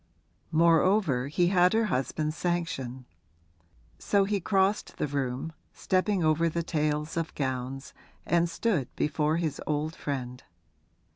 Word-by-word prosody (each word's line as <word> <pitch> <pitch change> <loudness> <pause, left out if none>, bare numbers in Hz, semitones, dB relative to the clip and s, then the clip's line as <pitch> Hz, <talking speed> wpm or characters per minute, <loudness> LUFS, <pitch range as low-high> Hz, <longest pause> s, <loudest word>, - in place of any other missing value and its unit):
Moreover 165 -4 +3
he 175 +4 +2
had 180 0 +4
her 225 0 +3
husband's 155 -1 -1
sanction; 165 -8 -3 0.9
so 200 -1 +2
he 200 +1 0
crossed 195 +2 +1
the - - 0
room, 135 +1 -3 0.2
stepping 190 0 0
over 160 +2 +3
the 170 +1 -2
tails 150 -1 -1
of 165 -1 -3
gowns, 130 0 -3 0.3
and 170 +1 +2
stood 165 - 0
before 150 +1 +1
his 160 -4 -2
old 155 +1 -1
friend. 125 -3 -5
160 Hz, 125 wpm, -28 LUFS, 140-175 Hz, 0.9 s, had